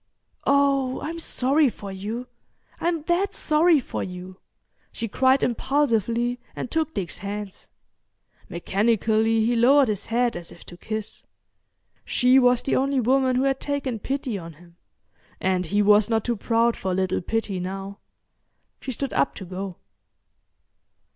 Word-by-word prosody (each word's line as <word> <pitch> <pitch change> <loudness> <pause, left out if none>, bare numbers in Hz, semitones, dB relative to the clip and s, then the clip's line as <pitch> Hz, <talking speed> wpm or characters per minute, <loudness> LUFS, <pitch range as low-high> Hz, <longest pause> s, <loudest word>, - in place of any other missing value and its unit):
"Oh, 275 -2 +2
I'm 330 +3 -5
sorry 280 -1 +2
for 200 -3 -9
you. 210 +6 -5 0.5
I'm 335 -2 -1
that 350 +4 0
sorry 310 +1 +3
for 255 - -5
you!" 185 0 -7 0.5
she 230 - -4
cried 260 +5 +3
impulsively, 240 -2 0 0.2
and - - -5
took 320 0 -1
Dick's 180 -3 -3
hands. 200 0 -6 0.8
Mechanically, 220 +4 +1
he 240 - +2
lowered 255 +3 +5
his 205 -3 -3
head 240 +1 +1
as 175 -1 -7
if 170 - -14
to 175 - -11
kiss—she 220 +4 -2
was 250 -1 +3
the - - 0
only 275 0 +1
woman 255 +1 +2
who 255 - +2
had 270 -1 +1
taken 280 -5 -3
pity 260 -3 -3
on 165 -1 -9
him, 170 +2 -19 0.6
and 185 -2 0
he 205 +4 +2
was 210 +1 +5
not 225 -2 +1
too 240 - 0
proud 230 +2 +1
for 190 -1 -3
a - - 0
little 185 -1 0
pity 205 0 -2
now. 195 +2 -6 0.8
She 265 - -4
stood 275 +2 -4
up 140 - +1
to 190 - -8
go. 185 +1 -6
230 Hz, 145 wpm, -24 LUFS, 195-270 Hz, 0.8 s, lowered